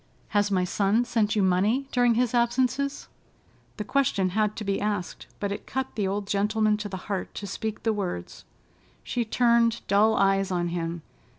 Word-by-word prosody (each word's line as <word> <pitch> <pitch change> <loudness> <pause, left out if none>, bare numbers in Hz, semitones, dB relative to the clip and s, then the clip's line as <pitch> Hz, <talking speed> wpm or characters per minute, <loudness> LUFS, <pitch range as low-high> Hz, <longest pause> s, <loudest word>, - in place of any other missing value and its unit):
"Has 205 -1 +2
my 185 -2 +1
son 200 +5 +1
sent 225 -2 +1
you 205 - +2
money 205 +9 +2
during 245 -2 +3
his 245 0 +1
absences?" 255 +4 0 0.7
The 210 - -3
question 210 -7 +1
had 215 +2 0
to 220 - -5
be 195 -1 -1
asked, 205 -4 -3
but 200 -1 -2
it 200 - -6
cut 265 0 -3
the 205 -3 -1
old 200 +1 -2
gentleman 210 +2 +1
to 210 0 -5
the 190 - -5
heart 200 -2 -4
to 205 - -5
speak 215 +2 -5
the 225 - +2
words. 185 - -5 0.6
She 240 - -1
turned 235 0 +2
dull 210 +3 +4
eyes 195 -1 +2
on 175 -2 -1
him. 170 -1 -3
210 Hz, 180 wpm, -26 LUFS, 195-235 Hz, 0.7 s, dull